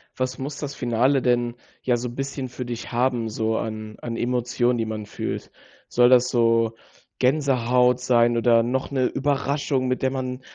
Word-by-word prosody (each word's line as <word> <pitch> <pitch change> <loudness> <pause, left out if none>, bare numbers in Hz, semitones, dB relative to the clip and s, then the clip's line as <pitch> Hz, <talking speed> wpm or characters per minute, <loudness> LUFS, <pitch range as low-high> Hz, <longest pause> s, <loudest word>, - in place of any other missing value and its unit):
Was 130 0 -2
muss 140 +2 -5
das 145 -2 -5
Finale 125 +3 +2
denn, 120 -1 +1 0.3
ja, 125 -1 +2
so 120 +1 -4
bisschen 135 +1 -4
für 125 0 -6
dich 120 -1 -6
haben, 120 -1 0
so 110 +1 -1
an 110 -1 -5
an 115 -1 -4
Emotionen, 120 0 0
die 115 - -1
man 110 -1 -5
fühlt? - - -5 0.4
Soll 120 0 +5
das 125 -1 +5
so 115 -2 +2 0.4
Gänsehaut 125 -3 +2
sein 120 -1 +3
oder 115 0 +4
noch 130 +4 -2
'ne 130 -2 +1
Überraschung, 140 -1 0
mit 130 - -1
der 130 0 +1
man 130 -1 -4
125 Hz, 170 wpm, -24 LUFS, 115-130 Hz, 0.4 s, Soll